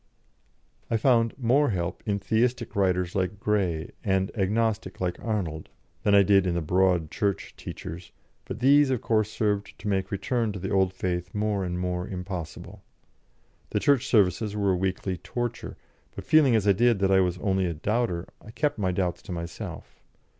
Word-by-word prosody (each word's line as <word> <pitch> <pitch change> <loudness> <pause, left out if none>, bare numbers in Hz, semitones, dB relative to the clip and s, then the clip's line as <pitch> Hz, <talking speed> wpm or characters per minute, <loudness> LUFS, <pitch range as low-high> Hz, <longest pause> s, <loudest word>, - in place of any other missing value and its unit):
I 115 - +2
found 115 -1 +2
more 135 +3 +3
help 85 -4 -2
in 100 -1 +1
Theistic 115 +4 0
writers 90 -3 +1
like 95 +1 -1
Grey, 95 -7 0
and 95 -1 0
Agnostic 105 -1 0
like 90 -1 -2
Arnold, 90 -9 -3 0.3
than 100 - +3
I 100 - +7
did 95 -1 +4
in 85 - 0
the 85 - 0
Broad 90 -1 +2
Church 100 -4 -2
teachers, 85 +2 -8 0.3
but 115 - -7
these, 140 +2 +5
of 130 -3 -1
course, 110 -2 +1
served 105 -2 -1
to 100 - -7
make 95 -1 0
return 110 +2 -1
to 100 - -6
the 95 +3 -4
old 95 -2 +3
faith 90 0 -3
more 105 -2 0
and 90 -1 -3
more 90 0 -2
impossible. 90 -4 -6 0.9
The - - 0
Church 140 -3 +2
services 105 0 +2
were 100 -2 +1
a - - +2
weekly 95 0 -2
torture, 120 +6 -5 0.4
but - - -7
feeling 145 -6 +5
as 105 -2 +1
I - - +7
did 115 +3 +3
that 95 0 +1
I 95 - +5
was 90 -1 +1
only 95 -1 0
a 85 - -2
doubter, 95 0 -1
I - - -13
kept 145 +2 -1
my 95 -3 +1
doubts 90 -1 -1
to - - -10
myself. 85 -1 -7
100 Hz, 180 wpm, -26 LUFS, 90-110 Hz, 0.9 s, I